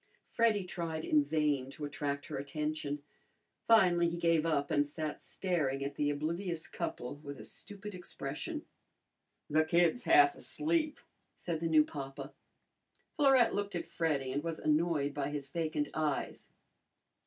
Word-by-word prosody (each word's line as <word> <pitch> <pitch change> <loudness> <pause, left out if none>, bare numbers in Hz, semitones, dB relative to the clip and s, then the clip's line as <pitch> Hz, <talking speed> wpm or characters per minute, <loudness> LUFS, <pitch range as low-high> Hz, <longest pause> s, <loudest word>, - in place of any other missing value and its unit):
Freddy 225 -4 +2
tried 165 -3 -4
in 150 -1 +4
vain 145 -3 0
to 145 +2 -6
attract 145 0 -3
her - - -5
attention. 150 0 -3 0.6
Finally 180 -6 +5
he 170 - -4
gave 165 -1 +2
up 145 -3 0
and 145 0 +3
sat 155 0 -4
staring 150 -8 -1
at 140 - -3
the 145 +1 0
oblivious 165 +4 -2
couple 125 +4 -4
with 140 -2 -8
a - - -8
stupid 205 - -7
expression. 180 - -5 0.8
"That 155 +1 +2
kid's 175 +9 +3
half 360 +1 +7
asleep," 310 -1 -1 0.4
said 170 -3 -3
the 165 0 -1
new 155 -1 +6
papa. 135 -1 -7 0.8
Florette 270 -5 +5
looked 205 -2 -2
at 170 - -2
Freddy 145 -6 -1
and 145 +3 -2
was 165 -1 -2
annoyed 150 -2 +1
by 140 -1 -2
his 145 -2 -5
vacant 155 -2 -1
eyes. 155 -3 -2
155 Hz, 145 wpm, -33 LUFS, 145-175 Hz, 0.8 s, half